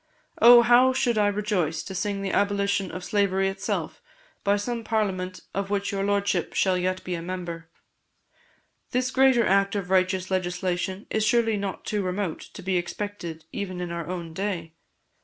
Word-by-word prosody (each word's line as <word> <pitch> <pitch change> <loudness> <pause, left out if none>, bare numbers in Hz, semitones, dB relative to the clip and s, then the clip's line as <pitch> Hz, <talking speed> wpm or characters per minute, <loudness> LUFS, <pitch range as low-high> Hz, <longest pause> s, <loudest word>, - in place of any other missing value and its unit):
Oh, 240 0 +9
how 245 +2 +5
should 240 -4 +1
I 205 - +4
rejoice 200 -6 -1
to 190 - -7
sing 195 +1 -2
the 195 - -2
abolition 200 -1 +1
of 180 +2 -7
slavery 195 -1 +1
itself 195 - -3 0.4
by 200 0 +3
some 230 +3 -3
Parliament 190 -5 -1
of 195 0 -2
which 200 0 -1
your 195 -1 -1
Lordship 200 0 0
shall 190 -2 +3
yet 185 +1 -1
be 180 - -4
a 170 - -3
member! 170 -2 -6 1.2
This 255 +1 0
greater 260 -3 +4
act 195 +1 +2
of 190 -2 -3
righteous 185 0 +1
legislation 185 +1 -2
is 220 - +1
surely 225 -1 +3
not 200 -2 -4
too 210 -1 -1
remote 185 -2 -2 0.2
to 195 - -8
be 185 0 +1
expected 175 -3 -5
even 185 -3 -4
in 175 -1 -4
our 170 -2 -4
own 170 -2 -5
day. 175 -3 -3
195 Hz, 170 wpm, -26 LUFS, 180-205 Hz, 1.2 s, Oh